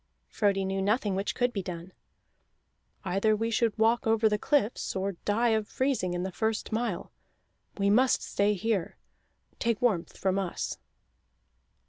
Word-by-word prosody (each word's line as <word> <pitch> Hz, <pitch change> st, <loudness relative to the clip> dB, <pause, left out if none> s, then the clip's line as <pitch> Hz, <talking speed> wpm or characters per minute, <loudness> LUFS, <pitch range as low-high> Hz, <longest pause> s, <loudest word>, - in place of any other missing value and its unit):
Frodi 195 Hz, -2 st, +1 dB
knew 195 Hz, 0 st, -1 dB
nothing 205 Hz, +1 st, +1 dB
which 195 Hz, +2 st, -2 dB
could 245 Hz, -1 st, +1 dB
be 200 Hz, -, -2 dB
done. 180 Hz, 0 st, -7 dB, 1.1 s
"Either 205 Hz, +4 st, +2 dB
we 225 Hz, +2 st, -1 dB
should 225 Hz, 0 st, +1 dB
walk 230 Hz, +2 st, +2 dB
over 225 Hz, 0 st, +4 dB
the 210 Hz, -1 st, +1 dB
cliffs, 250 Hz, -7 st, 0 dB
or 190 Hz, +1 st, -1 dB
die 230 Hz, +4 st, +2 dB
of 220 Hz, -2 st, +1 dB
freezing 255 Hz, -10 st, 0 dB
in 175 Hz, -, -2 dB
the 190 Hz, -, -3 dB
first 220 Hz, +4 st, -2 dB
mile. 220 Hz, -4 st, -2 dB, 0.7 s
We 200 Hz, -1 st, +2 dB
must 250 Hz, +4 st, +3 dB
stay 205 Hz, +1 st, +1 dB
here. 205 Hz, -3 st, -1 dB, 0.6 s
Take 230 Hz, -3 st, 0 dB
warmth 210 Hz, -9 st, 0 dB
from 190 Hz, 0 st, +1 dB
us." 185 Hz, -3 st, -3 dB
210 Hz, 150 wpm, -29 LUFS, 195-230 Hz, 1.1 s, over